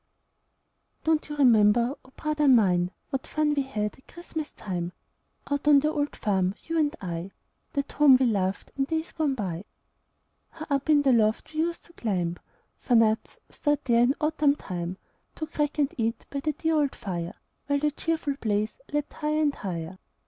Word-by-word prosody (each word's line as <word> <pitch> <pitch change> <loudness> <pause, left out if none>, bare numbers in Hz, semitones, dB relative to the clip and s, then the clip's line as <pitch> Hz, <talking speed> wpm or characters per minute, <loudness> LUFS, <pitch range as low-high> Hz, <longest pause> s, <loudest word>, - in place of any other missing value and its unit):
Don't 315 -1 +1
you 295 - -4
remember, 235 -2 +5
oh, - - -18
brother 305 -1 0
mine! 185 -8 +4 0.2
What 270 -2 -3
fun 305 -1 +1
we 285 - +1
had 210 -6 -3
at 265 - -24
Christmas 325 -3 -6
time, 175 -2 -4 0.6
Out 285 +1 -1
on 295 -1 +8
the 305 +1 +1
old 290 -2 -1
farm, 190 -2 0
you 330 0 -1
and 300 0 +1
I 175 0 -4 0.4
That 280 -2 -2
home 280 -3 +7
we 265 - +3
loved 195 -4 -1
in 270 - +1
days 320 +3 -2
gone 300 -4 0
by? 190 -5 -4 0.8
How 315 -1 -8
up 280 +2 0
in 295 -2 +5
the 270 - +4
loft 220 +5 +1
we 310 - -3
used 335 +1 -1
to 340 - -18
climb 180 - -2 0.4
For 245 - +1
nuts, 225 -1 +2
stored 295 -1 0
there 235 -2 +4
in 250 +3 +4
autumn 300 -2 +2
time, 180 -6 -5 0.4
To 315 - -3
crack 295 -1 -2
and 290 -2 +1
eat 230 +1 -1
by 280 - -2
the 305 +2 -1
dear 320 +3 0
old 290 -2 +1
fire, 175 -3 -4 0.3
While 285 0 +2
the 300 +1 +1
cheerful 305 -2 -2
blaze 210 -1 0 0.2
leaped 295 0 -1
high'r 305 0 -1
and 295 -2 +2
high'r? 180 -3 -5
275 Hz, 185 wpm, -27 LUFS, 210-300 Hz, 0.8 s, on